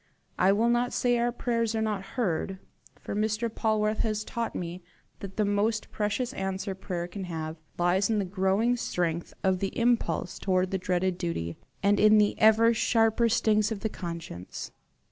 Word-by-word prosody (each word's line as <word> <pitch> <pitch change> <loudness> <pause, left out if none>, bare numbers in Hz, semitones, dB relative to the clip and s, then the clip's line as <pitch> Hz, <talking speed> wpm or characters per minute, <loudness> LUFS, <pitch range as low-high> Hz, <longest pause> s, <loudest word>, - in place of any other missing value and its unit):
I 185 +2 +5
will 225 +4 +3
not 240 +1 +1
say 245 -1 +2
our 240 +1 +1
prayers 230 -2 -1
are - - 0
not 210 -3 -1 0.2
heard, 190 -4 -1 0.4
for - - -5
Mr. 215 +2 0
Polwarth 215 -1 +1
has 215 -1 0
taught 235 +1 -4
me 175 +1 -5 0.4
that 195 -1 -8
the 210 - +2
most 210 +2 0
precious 210 +4 -1
answer 195 +1 -3
prayer 180 -2 -4
can 190 +1 -6
have, 160 -2 -5 0.2
lies 180 +3 +2
in 220 - +2
the 200 - 0
growing 195 +6 +1
strength 170 -6 -2
of 190 -1 +2
the 195 +3 -3
impulse 230 -8 +1
towards 185 -1 +1
the 190 - 0
dreaded 180 0 0
duty, 85 - -3 0.3
and 200 +1 +4
in 215 0 +6
the 210 -1 +4
ever 220 +1 +6
sharper 225 0 +2
stings 215 -1 +2
of 210 -3 -4
the 220 - -1
conscience. 170 - -7
205 Hz, 175 wpm, -28 LUFS, 185-225 Hz, 0.4 s, in